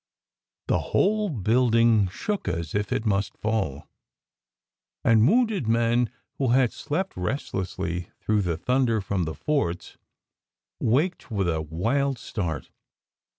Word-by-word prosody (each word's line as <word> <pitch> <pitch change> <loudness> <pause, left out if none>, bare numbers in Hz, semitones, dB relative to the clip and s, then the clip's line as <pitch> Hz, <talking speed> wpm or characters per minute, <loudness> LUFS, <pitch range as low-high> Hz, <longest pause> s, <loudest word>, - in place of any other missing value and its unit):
The - - +2
whole 210 +1 +1
building 115 - +3
shook 205 - -3
as 85 -1 -2
if 105 0 -1
it 110 - -1
must 100 -1 0
fall, 100 -11 -2 1.2
and 115 0 +5
wounded 220 - +2
men 115 +1 +2 0.3
who 135 - +1
had 125 0 +3
slept 180 +6 -3
restlessly 90 -4 -3
through 105 -1 +1
the 85 -4 -1
thunder 125 +3 +1
from 95 -3 -1
the 80 - -4
forts 140 - -2 0.8
waked 150 +11 +1
with 100 -5 0
a 80 -2 0
wild 115 - 0
start. 90 -8 -4
110 Hz, 120 wpm, -25 LUFS, 95-135 Hz, 1.2 s, and